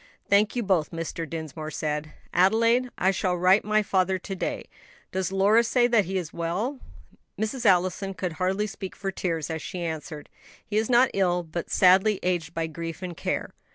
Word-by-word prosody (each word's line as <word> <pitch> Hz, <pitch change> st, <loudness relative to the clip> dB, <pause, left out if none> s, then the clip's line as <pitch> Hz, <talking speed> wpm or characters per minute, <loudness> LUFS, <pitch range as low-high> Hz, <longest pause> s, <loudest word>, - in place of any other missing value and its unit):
"Thank 205 Hz, +3 st, +3 dB
you 240 Hz, -, 0 dB
both," 185 Hz, -6 st, +1 dB
Mr. 165 Hz, -1 st, -5 dB
Dinsmore 155 Hz, -1 st, -5 dB
said. 155 Hz, -1 st, -3 dB, 0.2 s
"Adelaide, 230 Hz, +7 st, +3 dB
I 190 Hz, -, +3 dB
shall 185 Hz, -1 st, 0 dB
write 185 Hz, +4 st, +4 dB
my 215 Hz, +1 st, +2 dB
father 190 Hz, -1 st, +1 dB
to 195 Hz, +1 st, -6 dB
day. -, -, -3 dB, 0.5 s
Does 190 Hz, 0 st, -2 dB
Lora 200 Hz, +4 st, +4 dB
say 240 Hz, +1 st, +2 dB
that 230 Hz, -5 st, +3 dB
he 190 Hz, +2 st, -2 dB
is 170 Hz, -4 st, -4 dB
well?" 190 Hz, +12 st, -2 dB, 0.6 s
Mrs. 225 Hz, +2 st, -1 dB
Allison 190 Hz, +1 st, +2 dB
could 180 Hz, +1 st, -3 dB
hardly 190 Hz, +3 st, +1 dB
speak 195 Hz, -2 st, -7 dB
for 195 Hz, -1 st, -3 dB
tears, 165 Hz, -5 st, -2 dB
as 160 Hz, -1 st, -3 dB
she 180 Hz, -3 st, -5 dB
answered, 155 Hz, -2 st, -5 dB, 0.4 s
"He 210 Hz, -, -2 dB
is 220 Hz, +2 st, +1 dB
not 250 Hz, +1 st, +5 dB
ill, 180 Hz, -2 st, +1 dB
but 170 Hz, +1 st, -5 dB
sadly 190 Hz, +3 st, +4 dB
aged 180 Hz, -2 st, -1 dB
by 165 Hz, 0 st, 0 dB
grief 165 Hz, +2 st, -6 dB
and 180 Hz, -2 st, -5 dB
care. -, -, -3 dB
185 Hz, 185 wpm, -26 LUFS, 165-210 Hz, 0.6 s, not